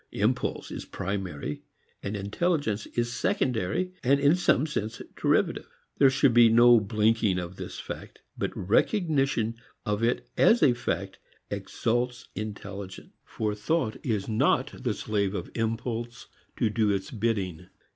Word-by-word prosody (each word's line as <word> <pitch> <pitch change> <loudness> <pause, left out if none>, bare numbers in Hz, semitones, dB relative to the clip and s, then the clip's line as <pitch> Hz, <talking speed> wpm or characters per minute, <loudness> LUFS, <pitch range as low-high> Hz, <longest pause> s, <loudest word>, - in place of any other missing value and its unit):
Impulse 115 +5 -1
is - - -5
primary 90 -7 -4 0.4
and 100 +1 -3
intelligence 110 - -1
is 120 0 0
secondary 125 - 0
and 140 +2 +4
in 145 +3 +5
some 155 -5 +3
sense 110 -8 -3 0.2
derivative. - - +1 0.3
There 135 - +7
should 135 -1 +3
be 120 -1 +7
no 120 +1 +7
blinking 110 -1 +2
of 90 0 -5
this - - -7
fact. - - -8 0.2
But - - -1
recognition 135 - +1 0.3
of 105 0 -1
it 120 +1 0
as 230 - +5
a 135 -5 +6
fact 120 - -3 0.3
exalts 120 +1 -2
intelligence. 100 -3 -7
For 105 -1 -2
thought 110 +3 -1
is 105 -5 -1
not 110 -1 +2
the - - -1
slave 100 -2 -1
of - - -5
impulse 115 +1 -3 0.3
to 110 - +1
do 110 -1 +2
its 95 -1 -1
bidding. 100 -7 -2
115 Hz, 135 wpm, -27 LUFS, 100-125 Hz, 0.4 s, There